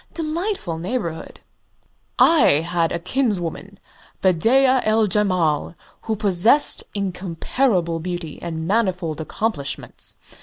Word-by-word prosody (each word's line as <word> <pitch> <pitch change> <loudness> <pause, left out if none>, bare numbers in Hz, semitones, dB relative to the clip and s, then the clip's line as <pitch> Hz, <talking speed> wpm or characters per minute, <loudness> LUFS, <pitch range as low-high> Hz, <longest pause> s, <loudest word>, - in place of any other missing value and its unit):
"Delightful 325 - -3
neighbourhood." 175 -3 -4 0.8
"I 235 - +5
had 170 -1 0
a - - -1
kinswoman, 195 -2 -2 0.4
Bedeea 255 +9 +4
el 215 0 +3
Jemal, 185 -6 +1 0.3
who 220 - -1
possessed 210 +7 +3
incomparable 185 0 -1
beauty 175 -2 -6
and 160 -1 -4
manifold 185 -7 0
accomplishments. 155 -4 -3
185 Hz, 90 wpm, -21 LUFS, 170-225 Hz, 0.8 s, I